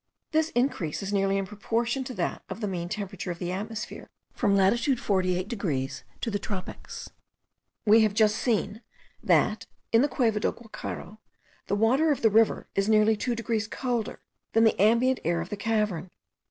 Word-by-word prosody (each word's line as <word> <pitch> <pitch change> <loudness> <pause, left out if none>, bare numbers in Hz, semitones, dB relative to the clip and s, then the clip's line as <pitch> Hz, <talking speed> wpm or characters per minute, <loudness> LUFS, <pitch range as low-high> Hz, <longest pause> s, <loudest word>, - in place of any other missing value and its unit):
This 315 0 +2
increase 240 - 0
is 195 +1 -3
nearly 195 0 +2
in 195 - -1
proportion 230 +5 -1
to 255 - -5
that - - -2
of - - -6
the 210 - -2
mean 175 -3 -3
temperature 200 -2 -5
of 175 - -3
the 175 0 -3
atmosphere, 220 +4 -5 0.2
from 200 - +2
latitude 235 +7 +3
48 185 -2 0
degrees 150 - -3 0.2
to 230 - -2
the 205 - -1
tropics. 195 -2 -6 0.7
We 220 +1 +7
have 215 -2 +2
just 215 -1 +4
seen 220 -2 0 0.4
that, - - +2 0.2
in 230 - +5
the 285 - +4
Cueva 230 -4 +1
del - - 0
Guacharo, 220 -1 -8 0.5
the - - +1
water 260 +9 +3
of 285 - -1
the 225 - +5
river 225 +1 +3
is 195 +2 +1
nearly 215 0 +5
2 240 +3 -1
degrees 225 -1 -1
colder 240 -2 -3 0.3
than 225 - +5
the 220 -4 +3
ambient 235 +5 +4
air 170 +1 +1
of 170 +2 -5
the - - -3
cavern. 210 -4 -1
215 Hz, 180 wpm, -27 LUFS, 195-235 Hz, 0.7 s, We